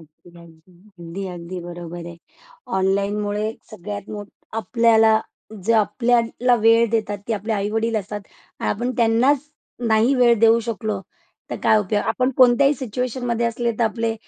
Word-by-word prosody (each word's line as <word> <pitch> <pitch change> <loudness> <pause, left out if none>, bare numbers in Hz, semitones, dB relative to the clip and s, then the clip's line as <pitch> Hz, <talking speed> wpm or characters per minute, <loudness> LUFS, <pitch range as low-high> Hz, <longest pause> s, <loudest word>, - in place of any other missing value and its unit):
अगदी, 170 +3 -12
अगदी 175 +1 -7
बरोबर 175 0 -8
आहे. 170 -1 -9 0.6
ऑनलाईनमुळे 205 +2 0 0.2
सगळ्यात 205 0 -7
मोठ 205 -1 -7 0.3
आपल्याला 225 -2 +4 0.4
जे 230 - +2
आपल्याला 235 +3 +2
वेळ 230 +1 +5
देतात 215 -3 -1
ते - - 0
आपले 215 +2 -3
आई-वडील 220 +2 -1
असतात. 205 0 -4 0.4
आपण 240 +4 -1
त्यांनाच 250 +5 +2 0.4
नाही 220 +5 +3
वेळ 245 -2 +5
देऊ 225 0 +6
शकलो 220 -3 -3 0.5
तर - - -3
काय 215 - +5
उपयोग. 205 +1 0
आपण 255 +4 0
कोणत्याही 260 +3 +5
सिच्युएशनमध्ये 245 -1 -2
असले 235 0 -1
तर 235 - +3
आपले 225 0 -1
220 Hz, 130 wpm, -21 LUFS, 200-235 Hz, 0.6 s, देऊ